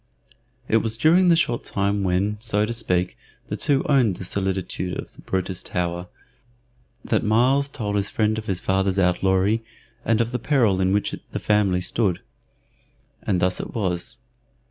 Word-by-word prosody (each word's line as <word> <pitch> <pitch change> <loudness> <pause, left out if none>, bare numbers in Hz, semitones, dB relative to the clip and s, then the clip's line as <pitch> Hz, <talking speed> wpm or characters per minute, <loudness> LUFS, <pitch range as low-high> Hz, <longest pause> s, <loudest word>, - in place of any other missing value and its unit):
It 110 - +3
was 110 0 -1
during 170 +8 +4
the 170 - +6
short 120 -8 0
time 100 0 0
when, 95 +3 0
so 105 -2 +1
to 115 - -3
speak, 90 -6 0 0.3
the - - -2
two 140 -2 +1
owned 125 -9 +3
the - - -7
solitude 95 -1 -2
of - - -8
the - - -15
Brutus 95 -1 -2
Tower, 90 0 -3 1.0
that - - +1
Myles 130 +6 +3
told 105 -7 -3
his 100 0 -1
friend 110 0 0
of 110 - -10
his 95 -2 -1
father's 95 +1 +1
outlawry 95 +4 +2 0.4
and 115 -1 +1
of 115 0 0
the 125 - -2
peril 115 -8 +2
in 95 0 +2
which 105 +1 0 0.2
the - - -2
family 100 -4 +1
stood. 95 0 0 1.0
And 95 -3 0
thus 90 +1 +1
it - - -7
was. 90 -6 -1
100 Hz, 165 wpm, -23 LUFS, 95-115 Hz, 1.0 s, the